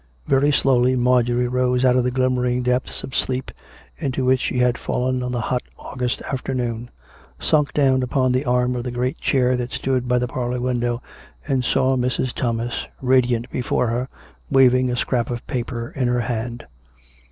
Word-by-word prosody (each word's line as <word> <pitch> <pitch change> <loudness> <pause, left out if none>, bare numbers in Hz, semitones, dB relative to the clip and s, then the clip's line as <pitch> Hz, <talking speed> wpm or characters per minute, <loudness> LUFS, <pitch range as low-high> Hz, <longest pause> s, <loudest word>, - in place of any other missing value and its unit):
Very 140 +2 +3
slowly 130 -2 +3
Marjorie 125 0 +2
rose 125 0 +1
out 125 -1 +4
of 125 - +3
the 125 - +1
glimmering 125 -1 0
depths 125 +1 -1
of 130 - -7
sleep 130 0 -1 0.5
into 135 -4 -1
which 130 0 +2
s'he - - -3
had 125 -1 +2
fallen 130 0 -1
on 125 0 -3
the 120 -1 -1
hot 125 +3 -1 0.2
August 125 -2 -3
after 135 0 -3
noon, 120 -1 -3 0.5
sunk 150 -2 +1
down 135 -3 +3
upon 130 0 +1
the 130 +2 +1
arm 125 0 +1
of 120 - -3
the 125 - -3
great 125 +4 -2
chair 130 -2 +2
that 125 0 -3
stood 130 -2 -1
by 125 0 +2
the 125 0 0
parlour 125 0 -2
window, 120 -1 -1 0.4
and 135 -3 +1
saw 130 +1 +2
Mrs. 125 0 -1
Thomas 120 0 -2
radiant 125 -2 +2
be - - -2
fore 125 -1 0
her, 120 +3 -1 0.4
waving 130 -1 +4
a 125 - -1
scrap 120 -1 -1
of 120 -1 -4
paper 120 -1 -4
in 130 -2 0
her 125 0 +1
hand. 120 0 -4
125 Hz, 185 wpm, -22 LUFS, 120-130 Hz, 0.5 s, out